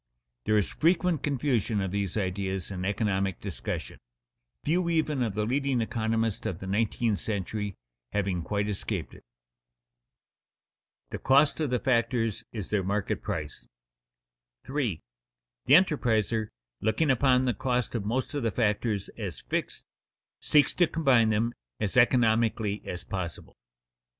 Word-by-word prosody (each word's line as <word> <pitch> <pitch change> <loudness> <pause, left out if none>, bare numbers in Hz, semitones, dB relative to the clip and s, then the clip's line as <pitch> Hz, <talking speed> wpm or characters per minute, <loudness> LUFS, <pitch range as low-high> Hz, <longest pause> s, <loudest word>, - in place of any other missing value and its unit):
There 110 - +3
is 105 - +1
frequent 170 -1 +2
confusion 125 -7 0
of 95 -2 -2
these 100 -1 -2
ideas 95 -1 -2
in 95 -1 -4
economic 95 -2 0
discussion, 80 - -5 0.6
few 170 +3 +1
even 155 -4 +1
of 110 -5 -1
the 105 0 0
leading 135 +1 +1
economists 115 -1 -1
of 90 - -3
the 95 - -8
nineteenth 110 +1 0
century 105 -1 -3 0.4
having 95 -4 0
quite 100 +4 -1
escaped 105 -2 -3
it. - - -14 1.9
[Sidenote: - - -45
The - - -4
cost 140 +4 +4
of 155 -3 0
the 125 - +2
factors 115 -3 +1
is 105 -5 -6
their 105 -2 +2
market 100 +1 -1
price] 75 -2 -5 1.0
3. 125 - -2 0.6
_The 140 - +8
enterpriser, 115 - +2 0.3
looking 135 +8 +2
upon 130 0 +3
the 125 - +2
cost 125 +2 -1
of 115 -4 -2
most 120 +8 -2
of 145 - -1
the 115 - +1
factors 105 -2 0
as 95 - -5
fixed, - - -3 0.5
seeks 150 -1 +3
to 175 - +3
combine 135 -10 +3
them 110 +2 +1 0.3
as 105 -2 -2
economically 115 -4 +3
as 90 - -5
possible. 90 -4 -5
110 Hz, 140 wpm, -28 LUFS, 100-130 Hz, 1.9 s, The